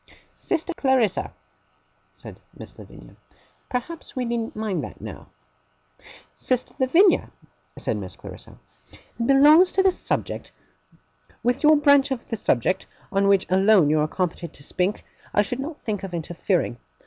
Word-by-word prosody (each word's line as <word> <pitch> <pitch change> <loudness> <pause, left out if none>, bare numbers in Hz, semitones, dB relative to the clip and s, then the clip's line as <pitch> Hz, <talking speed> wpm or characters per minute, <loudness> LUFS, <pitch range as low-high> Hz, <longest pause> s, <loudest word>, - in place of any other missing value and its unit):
'Sister 350 +1 -2
Clarissa,' 260 - +1 0.8
said - - -13 0.2
Miss - - -11
Lavinia. - - -14 0.5
'Perhaps 295 +8 -5
we 255 -1 -2
needn't 235 -1 -3
mind 215 -3 -2
that - - -9
now.' - - -9 1.1
'Sister 255 -1 -2
Lavinia,' 335 +9 +4 0.5
said - - -2
Miss - - -7
Clarissa, - - -12 0.3
'it 230 - -7
belongs 300 +7 +6
to 380 - +3
the 380 - +5
subject. - - -4 0.9
With 245 +2 +1
your 310 0 +6
branch 285 -2 +4
of 260 -3 -4
the 225 - -2
subject, 185 - 0 0.2
on 195 0 +2
which 195 -1 +3
alone 190 -4 +4
you 155 - +3
are 150 - +1
competent 170 -1 -3
to 140 - -9
speak, 185 +7 -2 0.3
I 205 - +5
should 245 +5 -4
not 300 +3 -5
think 210 -4 -4
of 190 -3 -6
interfering. 170 - -1
235 Hz, 145 wpm, -23 LUFS, 190-285 Hz, 1.1 s, belongs